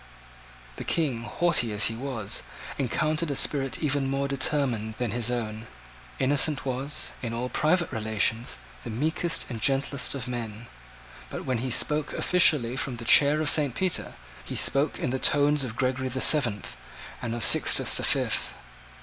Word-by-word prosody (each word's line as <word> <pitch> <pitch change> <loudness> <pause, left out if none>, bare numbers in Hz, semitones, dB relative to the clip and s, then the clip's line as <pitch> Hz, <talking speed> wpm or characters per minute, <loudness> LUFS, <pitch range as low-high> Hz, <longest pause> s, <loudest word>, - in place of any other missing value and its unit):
The - - -5
King, 130 -8 -1
haughty 120 0 +1
as 105 0 +3
he 115 - +1
was, 115 -5 -3 0.4
encountered 155 +5 -1
a 140 - -2
spirit 135 +1 +1
even 140 -2 0
more 135 +1 -1
determined 130 -6 -1
than 125 -4 -2
his 120 +1 -1
own. 110 -2 -4 0.5
Innocent 140 +1 +1
was, 135 +3 -2
in 115 -3 -4
all 125 +2 -3
private 170 +5 +1
relations, 110 +2 -1 0.3
the - - -7
meekest 160 +8 -1
and 115 -4 -7
gentlest 140 +2 0
of 125 -4 -5
men: 115 -2 -6 0.6
but - - -7
when 130 -3 -1
he 130 +2 -3
spoke 150 +4 0
officially 150 -9 +3
from 135 -3 -3
the 115 - -8
chair 145 +5 +5
of 155 - -1
St. 145 -5 +3
Peter, 185 -2 -2 0.3
he - - -7
spoke 140 +3 +1
in 125 - -3
the 130 - -2
tones 145 0 +3
of 115 -4 -6
Gregory 130 +1 -1
the 130 +1 -4
Seventh 120 - +2 0.4
and 115 -1 -3
of 120 - -4
Sixtus - - +4
the - - +2
Fifth. - - +1
130 Hz, 165 wpm, -26 LUFS, 115-145 Hz, 0.6 s, chair